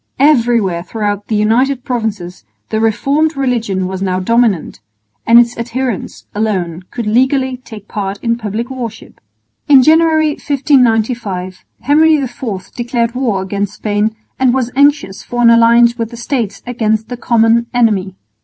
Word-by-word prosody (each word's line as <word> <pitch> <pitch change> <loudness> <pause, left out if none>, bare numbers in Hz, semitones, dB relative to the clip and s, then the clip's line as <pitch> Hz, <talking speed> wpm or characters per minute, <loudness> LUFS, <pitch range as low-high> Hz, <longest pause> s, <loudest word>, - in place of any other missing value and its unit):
Everywhere 235 - +2
throughout 205 +2 -4
the 220 - -1
United 245 +5 +1
Provinces 220 -9 -4 0.3
the 220 - -1
reformed 280 +8 0
religion 230 -8 -1
was 190 0 -5
now 185 -1 -1
dominant, 225 - 0 0.5
and 230 +1 +6
its 240 0 +4
adherents 240 -1 -4
alone 185 -5 -2
could 235 - -5
legally 260 +3 +1
take 220 -5 -12
part 200 -1 -4
in 230 0 +1
public 230 +2 -5
worship. 235 -4 -8 0.5
In 270 -3 +7
January, 315 +1 +4
1595, 235 -10 0 0.2
Henry 315 +2 +4
IV 240 -8 -5
declared 235 -1 -1
war 235 -7 -1
against 200 +1 -3
Spain 210 +1 -1 0.2
and 260 -1 +3
was 250 -2 -1
anxious 280 -8 +2
for 240 0 -3
an 235 - +7
alliance 235 +1 +5
with 230 -2 -4
the 235 - -10
States 235 -5 -3
against 220 -3 -1
the 245 - -4
common 235 0 +2
enemy. 210 -6 +1
230 Hz, 145 wpm, -14 LUFS, 210-255 Hz, 0.5 s, In